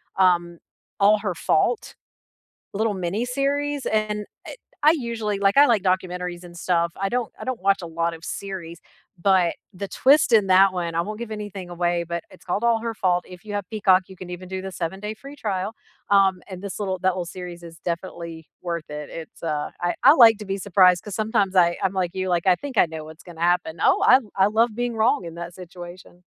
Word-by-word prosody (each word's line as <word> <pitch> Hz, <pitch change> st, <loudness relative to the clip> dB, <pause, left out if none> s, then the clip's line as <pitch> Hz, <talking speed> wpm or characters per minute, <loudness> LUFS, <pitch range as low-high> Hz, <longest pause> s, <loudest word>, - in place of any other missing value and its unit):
um, 175 Hz, -2 st, +2 dB, 0.4 s
All 205 Hz, +1 st, +5 dB
Her 200 Hz, -4 st, -3 dB
Fault, 435 Hz, -, 0 dB, 0.8 s
little 220 Hz, +1 st, +1 dB
mini-series, 275 Hz, +10 st, -1 dB
and 210 Hz, -1 st, -1 dB, 0.2 s
it -, -, -8 dB, 0.3 s
I 310 Hz, -, +8 dB
usually, 225 Hz, -5 st, -3 dB
like, 200 Hz, +4 st, +2 dB
I 285 Hz, -, +9 dB
like 230 Hz, -8 st, +3 dB
documentaries 180 Hz, -1 st, -2 dB
and 175 Hz, -1 st, -12 dB
stuff. 170 Hz, -1 st, 0 dB
I 195 Hz, -, +1 dB
don't 245 Hz, +2 st, -2 dB
I -, -, -5 dB
don't 255 Hz, -7 st, -4 dB
watch 195 Hz, 0 st, +3 dB
a 175 Hz, -, -6 dB
lot 165 Hz, +1 st, -1 dB
of 165 Hz, -, -10 dB
series, 175 Hz, -3 st, -6 dB, 0.4 s
but 185 Hz, -2 st, +3 dB, 0.2 s
the 195 Hz, +1 st, -6 dB
twist 285 Hz, +8 st, +4 dB
in 215 Hz, -4 st, +4 dB
that 190 Hz, 0 st, +6 dB
one 170 Hz, -2 st, -3 dB
I 165 Hz, -, +1 dB
won't 210 Hz, +5 st, -4 dB
give 235 Hz, -2 st, -6 dB
anything 205 Hz, -4 st, -6 dB
away, 175 Hz, 0 st, 0 dB
but 170 Hz, 0 st, -3 dB
it's 185 Hz, -, -17 dB
called 195 Hz, +5 st, -2 dB
All 230 Hz, -1 st, +3 dB
Her 230 Hz, 0 st, -3 dB
Fault. 180 Hz, -4 st, 0 dB
If 180 Hz, +3 st, -13 dB
you 205 Hz, -, -5 dB
have 205 Hz, -1 st, -2 dB
Peacock, 195 Hz, -4 st, +4 dB
you 190 Hz, -, -11 dB
can 185 Hz, -1 st, -10 dB
even 180 Hz, +1 st, -7 dB
do 190 Hz, 0 st, -5 dB
the 190 Hz, 0 st, -6 dB
seven-day 190 Hz, +4 st, -4 dB
free 275 Hz, +6 st, -12 dB
trial, 200 Hz, -5 st, -2 dB, 0.4 s
um, 195 Hz, -2 st, +4 dB
and 185 Hz, -2 st, -8 dB
this 200 Hz, -1 st, -6 dB
little 190 Hz, -3 st, -2 dB
that 185 Hz, 0 st, +2 dB
little 180 Hz, -1 st, -3 dB
series 175 Hz, -1 st, -8 dB
is 165 Hz, -1 st, -11 dB
definitely 170 Hz, -2 st, -5 dB
worth 170 Hz, -3 st, -4 dB
it. 150 Hz, 0 st, -6 dB
It's, 165 Hz, -1 st, -10 dB
uh, 150 Hz, -3 st, -2 dB
I 175 Hz, 0 st, 0 dB
I -, -, +10 dB
like 230 Hz, -6 st, +8 dB
to -, -, -6 dB
be 195 Hz, 0 st, -3 dB
surprised 185 Hz, -2 st, +4 dB
'cause 210 Hz, -, -7 dB
sometimes 205 Hz, -3 st, 0 dB
I 170 Hz, -1 st, +4 dB
I'm 195 Hz, 0 st, 0 dB
like 185 Hz, -2 st, -1 dB
you, 185 Hz, 0 st, -2 dB
like, 175 Hz, 0 st, 0 dB
I 185 Hz, -, +6 dB
think 275 Hz, +5 st, -8 dB
I -, -, +6 dB
know 160 Hz, -1 st, -7 dB
what's 155 Hz, +1 st, -12 dB
gonna 170 Hz, -2 st, -12 dB
happen. 175 Hz, -1 st, +1 dB
Oh, -, -, +3 dB
I 260 Hz, -, +8 dB, 0.2 s
I 195 Hz, 0 st, +4 dB
love 220 Hz, +1 st, +2 dB
being 240 Hz, -1 st, -1 dB
wrong 220 Hz, -2 st, +2 dB
in 165 Hz, -1 st, -7 dB
that 170 Hz, 0 st, -7 dB
situation. 180 Hz, 0 st, -11 dB
185 Hz, 220 wpm, -23 LUFS, 175-210 Hz, 0.8 s, I